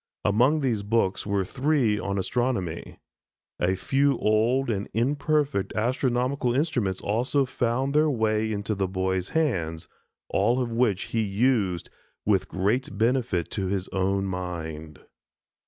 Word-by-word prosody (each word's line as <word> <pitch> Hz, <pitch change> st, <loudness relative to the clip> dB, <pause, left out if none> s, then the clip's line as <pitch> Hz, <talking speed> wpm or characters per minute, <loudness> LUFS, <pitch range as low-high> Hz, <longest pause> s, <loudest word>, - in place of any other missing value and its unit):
Among 125 Hz, +9 st, +3 dB
these 120 Hz, -6 st, 0 dB
books 100 Hz, -2 st, 0 dB
were 100 Hz, -2 st, 0 dB
three 130 Hz, -3 st, +1 dB
on 100 Hz, 0 st, -2 dB
Astronomy. 100 Hz, -4 st, -2 dB, 0.6 s
A 95 Hz, +2 st, +2 dB
few 135 Hz, +6 st, +1 dB
old 115 Hz, +4 st, +2 dB
and 100 Hz, -1 st, -3 dB
imperfect 145 Hz, -1 st, 0 dB
astronomical 125 Hz, +2 st, 0 dB
instruments 125 Hz, -, 0 dB
also 125 Hz, +7 st, +1 dB
found 130 Hz, +2 st, -1 dB
their 155 Hz, +1 st, +4 dB
way 110 Hz, -4 st, +1 dB
into 105 Hz, +1 st, -2 dB
the 95 Hz, -2 st, -1 dB
boy's 95 Hz, 0 st, -1 dB
hands, 85 Hz, -, -1 dB, 0.4 s
all 115 Hz, +6 st, +2 dB
of 125 Hz, -2 st, -1 dB
which 115 Hz, -5 st, +1 dB
he 115 Hz, -, +2 dB
used 100 Hz, -4 st, 0 dB, 0.3 s
with 100 Hz, -2 st, +2 dB
great 100 Hz, +3 st, -1 dB
benefit 115 Hz, -6 st, +1 dB
to 95 Hz, -2 st, -2 dB
his 95 Hz, -1 st, -2 dB
own 95 Hz, 0 st, 0 dB
mind. 80 Hz, -5 st, -5 dB
110 Hz, 130 wpm, -26 LUFS, 95-130 Hz, 0.6 s, their